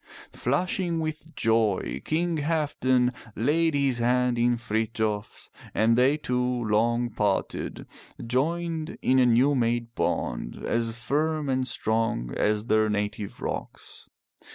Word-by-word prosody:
Flushing 170 +5 -1
with 155 0 -5
joy 110 - +1
King 165 +1 0
Halfdan 140 -5 +1 0.2
laid 155 +6 +2
his 135 -3 +1
hand 125 +1 +2
in 120 0 +3
Frithjof's 110 -2 -2 0.2
and 115 +1 +4
they 130 +5 +4
two, 125 -4 -1
long 120 0 +1
parted, 105 -2 -2 0.4
joined 160 +6 -1
in 130 +1 +4
a 125 - +5
new 125 +5 +4
made 120 -2 0
bond - - -2
as 115 0 -1
firm 150 +4 -1
and 130 -1 0
strong 110 - 0
as 105 0 +1
their 110 -2 +3
native 105 -1 -3
rocks. - - -6
125 Hz, 120 wpm, -26 LUFS, 110-145 Hz, 0.4 s, a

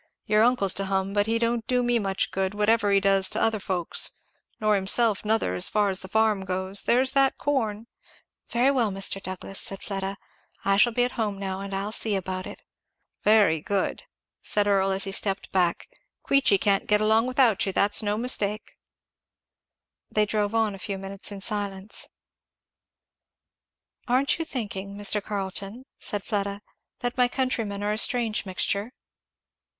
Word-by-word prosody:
"Your 215 0 +3
uncle's 225 -5 +3
to 195 - -2
hum, 195 0 -1
but 205 0 +1
he 225 +1 +1
don't 230 0 -1
do 250 -1 +1
me 240 -1 +1
much 195 -2 -1
good, 190 +1 -2
whatever 210 0 +2
he 200 - +5
does 195 -1 +2
to - - 0
other 225 -1 +1
folks 185 -4 +1 0.5
nor 215 -1 +2
himself 205 +2 +2
nother, 215 - 0
as 90 - +4
far 210 -1 +1
as 190 - +1
the 190 - -5
farm 215 -1 +1
goes; 190 +1 0
there's 260 +2 +3
that 270 -1 +3
corn" 225 -7 -1 0.6
"Very 245 +4 +2
well, 240 -6 +1
Mr. 195 0 -2
Douglass," 190 +1 -5
said 195 - -5
Fleda, 195 0 -4 0.5
"I 195 0 +3
shall 240 +4 +5
be 245 +2 +1
at 250 - 0
home 205 -2 -2
now 190 -1 -4
and 200 0 -6
I'll 195 +2 -3
see 220 -1 +1
about 185 -1 -4
it." - - -11 0.6
"Very 205 -8 +4
good!" 195 +3 -2 0.4
said 205 -1 0
Earl 195 -1 +2
as 195 0 0
he 195 - -3
stepped 195 0 -1
back, 180 -2 0 0.4
"Queechy 275 -7 +3
can't 195 0 +1
get 210 0 +3
along 220 +2 +3
without 255 -5 +3
you, - - 0
that's 205 +3 +3
no 210 0 -1
mistake." 215 -3 +1 1.4
They 215 0 +2
drove 210 0 -1
on 220 -2 +1
a 195 - -9
few 195 0 -4
minutes 195 +1 -4
in 200 -1 -7
silence. 200 -1 -2 2.0
"Aren't 260 +5 +2
you 325 - -1
thinking, 200 -8 -5
Mr. 205 0 +2
Carleton," 200 +4 -5
said 205 -2 -3
Fleda, 200 -1 -3 0.4
"that 245 +1 -2
my 250 - +5
countrymen 230 -6 -2
are 210 +1 0
a 215 - -1
strange 230 -4 +2
mixture?" 200 +5 -2
205 Hz, 170 wpm, -25 LUFS, 195-225 Hz, 2.0 s, he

